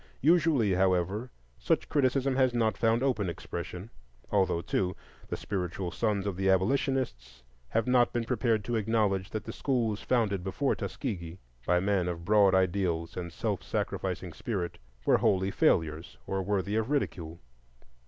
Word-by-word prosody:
Usually, 150 - +4
however, 95 +5 +1 0.3
such - - +1
criticism 135 -1 +1
has 130 -2 +3
not 110 -2 +2
found 115 +2 +2
open 110 -9 +1
expression, 90 +4 -6 0.4
although, 95 -4 +2
too, 90 -1 -1 0.3
the - - -3
spiritual 90 -2 -3
sons 105 0 0
of 100 -3 -2
the 95 0 +1
Abolitionists 95 - 0 0.3
have 115 - +1
not 125 -1 +4
been 120 - -1
prepared 115 -2 0
to 120 +2 -1
acknowledge 105 -3 +1
that 110 - -4
the 115 - -7
schools 115 -6 0
founded 105 -7 +1
before 100 +9 0
Tuskegee, 90 - -5 0.3
by 90 0 +4
men 95 -1 +1
of 85 -1 -4
broad 100 -2 +5
ideals 85 -3 0
and 85 -1 -5
self - - -2
sacrificing 90 -2 -3
spirit, 95 -2 -4 0.3
were - - +4
wholly 95 0 +2
failures 80 -3 +1
or 95 0 -2
worthy 100 +1 -1
of 110 +2 -1
ridicule. 85 - -2
100 Hz, 150 wpm, -29 LUFS, 90-115 Hz, 0.4 s, broad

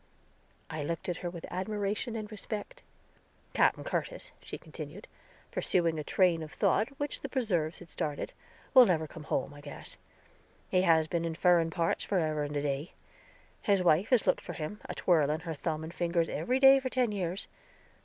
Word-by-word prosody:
I 155 -2 -4
looked 165 +4 -3
at 175 - -1
her 175 - -4
with 170 -1 -7
admiration 205 +4 -2
and 215 -1 -5
respect. 215 - -5 0.7
"Capen - - +3
Curtis," - - -3
she - - -7
continued, - - -9 0.4
pursuing 165 -3 +2
a - - -3
train 175 0 +3
of 155 -1 -7
thought 220 - +2
which 290 -1 -3
the - - -5
preserves 175 - 0
had 175 - -12
started, 150 -3 -3 0.4
"will 255 -2 +9
never 160 -3 +2
come 155 0 -10
home, 140 - -1
I 145 - -12
guess. 145 0 -8 0.7
He 185 - +3
has 165 -3 +4
been 170 +1 -1
in 165 -1 -2
furen 170 -1 +4
parts 165 0 0
forever 155 -6 0
and 145 0 -2
a 145 - -1
day; 145 +3 -2 0.7
his 200 -3 +2
wife 175 +4 +4
has 250 -4 +4
looked 185 - +2
for - - -7
him, 160 +7 -5
a - - -4
twirling 155 -3 +2
her 165 -1 -4
thumb 155 +1 -3
and 160 +2 -7
fingers, 170 -2 0
every 250 - 0
day 270 0 +8
for 260 -1 -3
ten 250 -3 +1
years. 185 -1 -2
175 Hz, 185 wpm, -31 LUFS, 160-210 Hz, 0.7 s, will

